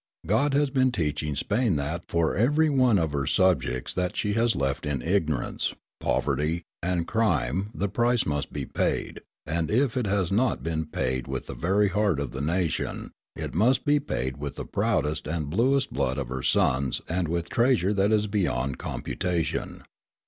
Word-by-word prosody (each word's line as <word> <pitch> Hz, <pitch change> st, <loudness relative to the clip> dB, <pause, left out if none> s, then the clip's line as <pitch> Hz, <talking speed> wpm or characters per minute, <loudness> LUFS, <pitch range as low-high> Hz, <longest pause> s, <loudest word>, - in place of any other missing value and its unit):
God 135 Hz, -, +2 dB
has 145 Hz, -1 st, +2 dB
been 130 Hz, -1 st, +3 dB
teaching 75 Hz, -7 st, -1 dB
Spain 105 Hz, -, +1 dB
that 75 Hz, +4 st, -3 dB
for 85 Hz, -1 st, +1 dB
every 150 Hz, -, +3 dB
one 130 Hz, -6 st, +4 dB
of 80 Hz, -4 st, 0 dB
her 70 Hz, -2 st, -1 dB
subjects 65 Hz, -9 st, +1 dB
that 90 Hz, +2 st, -2 dB
she 105 Hz, -1 st, 0 dB
has 115 Hz, +1 st, +2 dB
left 70 Hz, +2 st, -1 dB
in 70 Hz, -4 st, -2 dB
ignorance, 80 Hz, -5 st, 0 dB, 0.2 s
poverty, 80 Hz, +4 st, 0 dB, 0.2 s
and 85 Hz, -1 st, -1 dB
crime 95 Hz, -, +1 dB
the 100 Hz, -, 0 dB
price 120 Hz, +4 st, +1 dB
must 75 Hz, -2 st, -2 dB
be -, -, -4 dB
paid; -, -, -2 dB, 0.2 s
and, 80 Hz, 0 st, -1 dB
if 125 Hz, +3 st, +2 dB
it 125 Hz, -4 st, 0 dB
has 95 Hz, -3 st, 0 dB
not 120 Hz, +5 st, +1 dB
been 80 Hz, -1 st, -2 dB
paid 65 Hz, -4 st, -2 dB
with -, -, -4 dB
the -, -, -6 dB
very 100 Hz, +4 st, +2 dB
heart 100 Hz, -5 st, +1 dB
of 70 Hz, -2 st, -3 dB
the 65 Hz, -, -5 dB
nation, 85 Hz, +3 st, -1 dB, 0.2 s
it -, -, -5 dB
must 125 Hz, +8 st, +3 dB
be 145 Hz, 0 st, +4 dB
paid 65 Hz, -, -3 dB
with 70 Hz, -1 st, -5 dB
the -, -, -5 dB
proudest 80 Hz, -8 st, 0 dB
and 75 Hz, -2 st, -3 dB
bluest 130 Hz, -, +2 dB
blood 65 Hz, +2 st, 0 dB
of 70 Hz, -4 st, -3 dB
her 65 Hz, 0 st, -3 dB
sons 65 Hz, +1 st, +1 dB
and 85 Hz, 0 st, -1 dB
with 85 Hz, +1 st, -2 dB
treasure 115 Hz, -5 st, +2 dB
that 100 Hz, +1 st, +2 dB
is 105 Hz, -1 st, +3 dB
beyond 85 Hz, -, -1 dB
computation. 85 Hz, -4 st, -3 dB
90 Hz, 180 wpm, -26 LUFS, 75-110 Hz, 0.2 s, one